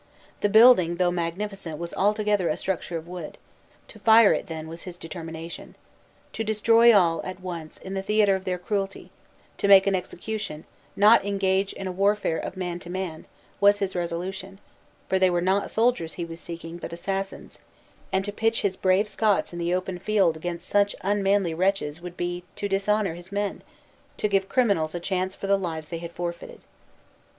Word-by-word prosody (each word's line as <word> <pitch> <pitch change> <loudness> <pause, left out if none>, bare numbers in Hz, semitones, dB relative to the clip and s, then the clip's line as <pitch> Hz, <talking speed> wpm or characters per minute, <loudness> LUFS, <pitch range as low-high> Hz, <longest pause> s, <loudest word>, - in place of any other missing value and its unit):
The 205 - +1
building, 215 -6 +6
though 175 0 +2
magnificent, 175 0 -4
was 170 +1 -6
altogether 205 -3 +1
a 155 - -1
structure 175 -2 -3
of 165 +1 -9
wood; 175 -3 -7 0.5
to - - -13
fire 225 -1 +6
it, - - -3
then, 160 -1 -6
was 165 +1 -8
his 180 -2 -8
determination. 165 -1 -8 0.6
TO 225 - -2
destroy 225 +2 +5
all, 175 -6 +4
at 185 0 -6
once, 170 -4 -7
in 190 - -8
the 195 - -2
theater 210 0 +3
of 190 - -5
their 185 -1 -2
cruelty; 195 +1 -4 0.5
to - - +1
make 195 -1 +8
an 200 - +2
execution, 190 -2 -4 0.3
not 210 +2 +6
engage 195 -1 0
in 195 - -7
a 185 - -2
warfare 195 -2 +1
of 185 - -6
man 175 -2 -3
to 175 - -11
man, 180 -3 -5 0.3
was 205 0 +5
his 195 -2 -2
resolution; 185 +3 -4 0.5
for 190 - +1
they 185 -1 +4
were 175 -1 +1
not 190 +3 +1
soldiers 225 -8 +1
hew 170 -1 -5
as 165 - -8
seeking, 170 0 -8
but 170 - -7
assassins; 195 +3 -5 0.5
and 190 0 0
to 205 - -3
pitch 225 +2 0
his 195 -2 +1
brave 190 +3 +2
Scots 210 -3 +1
in 175 - -5
the 170 0 -1
open 185 0 -3
field 195 -5 +2
against 170 +2 -5
such 205 0 +2
unmanly 195 -3 +1
wretches 175 -3 0
would 175 0 -9
be 175 0 -3
to 205 - -3
dishonor 200 -1 +1
his 175 +3 -10
men, 200 0 -2 0.6
to - - +1
give 195 -1 0
criminals 200 -11 +1
a - - -2
chance 185 +1 -2
for - - -7
the 200 0 +3
lives 160 -4 -4
they 165 - -4
had 170 0 -7
forfeited. 170 0 -6
190 Hz, 185 wpm, -25 LUFS, 170-200 Hz, 0.6 s, make